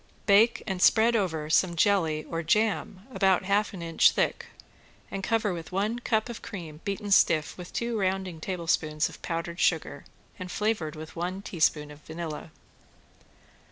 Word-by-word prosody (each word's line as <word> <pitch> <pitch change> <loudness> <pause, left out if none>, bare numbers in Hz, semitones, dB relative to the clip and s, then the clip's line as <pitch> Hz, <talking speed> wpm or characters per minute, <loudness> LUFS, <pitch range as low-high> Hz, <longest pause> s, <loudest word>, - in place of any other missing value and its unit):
Bake 215 +3 +4
and 190 -3 -3
spread 230 +4 +5
over 165 -8 -1
some 170 +2 +2
jelly 165 -4 +2
or 165 +1 -4
jam 205 +2 0
about 190 -2 +3
half 205 +2 +1
an 180 -4 -7
inch 165 -1 +4
thick, - - -1 0.6
and 195 - -4
cover 215 -2 0
with 165 -2 -7
one 210 +5 -1
cup 220 -2 0
of 235 -2 -7
cream 170 -8 -8
beaten 200 +1 -4
stiff 155 -5 +4
with 180 -1 -9
two 235 -2 -2
rounding 190 -3 -1
tablespoons 165 -4 0
of - - -13
powdered 170 0 -4
sugar 160 -3 0 0.3
and 185 -1 -6
flavored 210 -8 -1
with 155 0 -9
one 180 +3 -4
teaspoon 155 -5 0
of 145 - -12
vanilla. 160 -1 -6
185 Hz, 160 wpm, -27 LUFS, 165-205 Hz, 0.6 s, spread